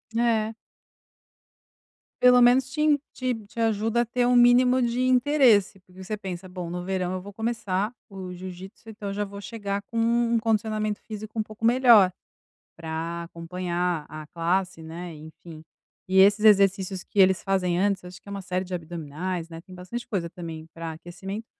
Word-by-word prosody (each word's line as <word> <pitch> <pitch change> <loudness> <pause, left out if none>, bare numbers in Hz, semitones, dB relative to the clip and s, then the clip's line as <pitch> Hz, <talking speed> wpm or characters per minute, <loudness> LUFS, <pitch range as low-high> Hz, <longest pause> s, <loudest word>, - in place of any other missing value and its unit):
É. 225 -2 +1 1.7
Pelo 250 0 +7
menos 250 +2 +5
te 300 - -2
em 300 -1 +4
te-te 235 -4 -4
ajuda 225 +1 +1
a - - 0
ter 245 +1 0
um 250 0 +3
mínimo 250 +1 +5
de 240 +1 0
interesse, 250 -6 +4
porque 185 +1 -14
você 210 +3 -4
pensa: 185 -2 -7
"Bom, 180 -1 -6
no 175 +1 -4
verão 185 -1 -2
eu 185 - -4
vou 200 +2 -10
começar 220 -1 -2 0.2
o 190 -2 -7
jiu-jítsu, 185 +4 -10
então 210 -2 -6
eu - - -4
já 205 +1 -1
vou 200 0 -8
chegar 200 -1 -4
com 230 +2 -4
um 235 0 +2
condicionamento 215 -1 -1
físico 215 +1 -8
um 220 - +1
pouco 215 +1 -14
melhor 230 -5 +6 0.6
pra 165 +1 -4
acompanhar 175 -1 -3
a 155 +1 -8
classe", 175 +1 -1
né? 165 +2 -7
E 150 - -12
enfim, 160 -1 -12 0.5
e 190 +1 +1
esses 205 +2 +5
exercícios 195 -2 +4
que 205 - -4
eles 190 -1 +5
fazem 185 -3 0
antes, 195 0 +1
acho 180 0 -11
que - - -26
é - - -8
uma 200 0 -5
série 185 0 -2
de 185 - -8
abdominais, 170 +1 -4
né, 165 0 -9
tem 185 +1 -14
bastante 185 +7 -7
coisa 180 -5 -2
também 165 -3 -8
pra 165 -1 -6
aquecimento, 190 +6 -7
195 Hz, 180 wpm, -25 LUFS, 180-225 Hz, 1.7 s, Pelo